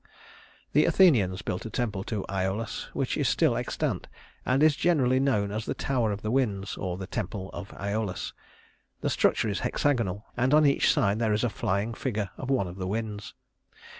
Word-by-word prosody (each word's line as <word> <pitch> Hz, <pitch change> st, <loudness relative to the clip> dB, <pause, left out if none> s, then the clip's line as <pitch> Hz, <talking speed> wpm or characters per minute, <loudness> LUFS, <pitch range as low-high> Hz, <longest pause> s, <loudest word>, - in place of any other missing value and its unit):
The -, -, +5 dB
Athenians 110 Hz, -, +4 dB
built 90 Hz, +1 st, -3 dB
a 110 Hz, -, -5 dB
temple 105 Hz, -5 st, -2 dB
to 105 Hz, -4 st, -3 dB
Æolus, 95 Hz, +3 st, -2 dB
which -, -, -1 dB
is -, -, +2 dB
still -, -, +3 dB
extant, -, -, -2 dB, 0.4 s
and 130 Hz, +3 st, +3 dB
is 155 Hz, -2 st, +5 dB
generally 135 Hz, -6 st, +3 dB
known 105 Hz, -7 st, +1 dB
as 110 Hz, +1 st, -4 dB
the -, -, -1 dB
Tower 120 Hz, -5 st, 0 dB
of 100 Hz, 0 st, -5 dB
the 110 Hz, -, -1 dB
Winds, 105 Hz, -7 st, 0 dB
or 90 Hz, -1 st, -3 dB
the 95 Hz, -, -5 dB
Temple 100 Hz, -1 st, -4 dB
of 100 Hz, -, -6 dB
Æolus. 100 Hz, -2 st, -3 dB, 0.7 s
The -, -, 0 dB
structure -, -, +2 dB
is 100 Hz, -3 st, -1 dB
hexagonal, 115 Hz, -8 st, 0 dB
and 125 Hz, +4 st, +3 dB
on 155 Hz, 0 st, +6 dB
each 140 Hz, -, +4 dB
side 100 Hz, +2 st, +2 dB
there 110 Hz, -2 st, +2 dB
is 105 Hz, -, 0 dB
a 120 Hz, -, +2 dB
flying 100 Hz, +3 st, -1 dB
figure 105 Hz, -5 st, -3 dB
of 130 Hz, -, -6 dB
one 130 Hz, -8 st, +2 dB
of 90 Hz, +1 st, -8 dB
the 95 Hz, -1 st, -3 dB
winds. 105 Hz, 0 st, -4 dB
105 Hz, 190 wpm, -27 LUFS, 100-125 Hz, 0.7 s, on